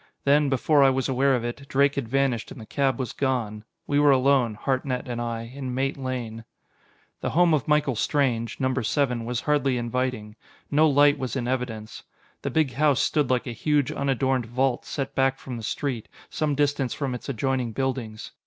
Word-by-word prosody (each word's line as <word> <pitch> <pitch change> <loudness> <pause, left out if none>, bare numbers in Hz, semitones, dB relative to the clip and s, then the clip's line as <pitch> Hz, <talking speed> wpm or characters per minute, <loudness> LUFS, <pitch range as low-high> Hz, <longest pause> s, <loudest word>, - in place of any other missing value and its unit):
Then, 145 +1 +4
before 140 +3 +3
I 135 - +7
was 130 0 0
aware 135 0 +2
of 120 -1 -2
it, 140 +4 -6
Drake 140 +1 +3
had 140 -5 -3
vanished 135 -3 0
and - - -9
the 110 - -9
cab 135 0 0
was 130 -4 -4
gone. 120 -6 -1 0.2
We 145 0 +1
were 145 0 +5
alone, 130 -4 +3
Hartnett 130 +1 -2
and 120 -1 -3
I, 115 -1 -3
in 130 +1 -6
Mate 135 +1 0
Lane. 125 -4 -5 0.8
The - - -2
home 175 0 +4
of 150 - +1
Michael 150 -4 +2
Strange 120 -2 0
number 130 -1 0
seven 120 0 0
was 120 0 -2
hardly 140 -4 +1
inviting. 120 -3 -3 0.3
No 155 +2 +5
light 145 0 +4
was 130 0 -3
in 120 -2 -2
evidence. 120 -4 -4 0.4
The - - -2
big 155 -5 +1
house 145 +1 +3
stood 150 -4 +1
like 125 -1 +1
a 120 - -4
huge, 145 +3 +1
unadorned 135 -3 0
vault 130 +1 0
set 135 0 -4
back 135 0 +2
from 130 - -7
the - - -6
street, 120 +1 -3 0.2
some 150 -2 0
distance 145 -3 0
from 135 -3 -2
its 125 - -7
adjoining 130 -1 -1
buildings. 125 -3 -3
130 Hz, 190 wpm, -25 LUFS, 120-140 Hz, 0.8 s, I